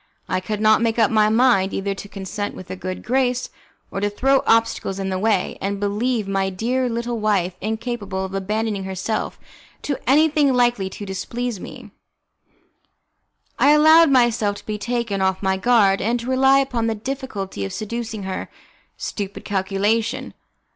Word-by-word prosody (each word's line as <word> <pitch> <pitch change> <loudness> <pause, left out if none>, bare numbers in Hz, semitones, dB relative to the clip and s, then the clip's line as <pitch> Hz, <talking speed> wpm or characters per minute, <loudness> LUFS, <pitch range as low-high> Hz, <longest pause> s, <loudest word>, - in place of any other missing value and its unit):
I 185 - 0
could 205 +3 -4
not 215 +1 +4
make 230 0 +1
up 225 -3 +3
my 215 -1 +4
mind 220 -4 +3
either 195 0 -1
to 200 +1 -9
consent 200 +1 -5
with 185 -1 -9
a - - -3
good 185 0 -6
grace, 250 0 0 0.4
or - - -3
to 205 +1 0
throw 270 +6 +2
obstacles 225 -4 +2
in 195 -1 -3
the 185 -1 -2
way, 205 -2 0
and, 200 +1 -2
believing 205 0 -1
my 195 0 +1
dear 245 +7 -1
little 235 0 -3
wife 200 -4 +1
incapable 215 -3 -3
of 190 - -8
abandoning 205 +1 -2
herself 190 +3 -3 0.4
to 285 - -2
anything 295 -1 +4
likely 240 -6 +2
to 205 - -8
displease 230 +3 -4
me, - - -10 1.7
I 290 - +6
allowed 315 +2 +7
myself 240 -6 +3
to - - -12
be 210 -1 -4
taken 235 -3 -2
off 190 +1 0
my 190 0 +2
guard, 200 -2 +3
and 235 +4 0
to 235 +2 -6
rely 265 +1 +5
upon 250 -4 0
the 225 - 0
difficulty 215 - -5
of 95 - -4
seducing 225 -1 -5
her. 190 0 -4 0.5
Stupid 200 -1 -5
calculation! 210 +6 -1
215 Hz, 165 wpm, -21 LUFS, 195-245 Hz, 1.7 s, allowed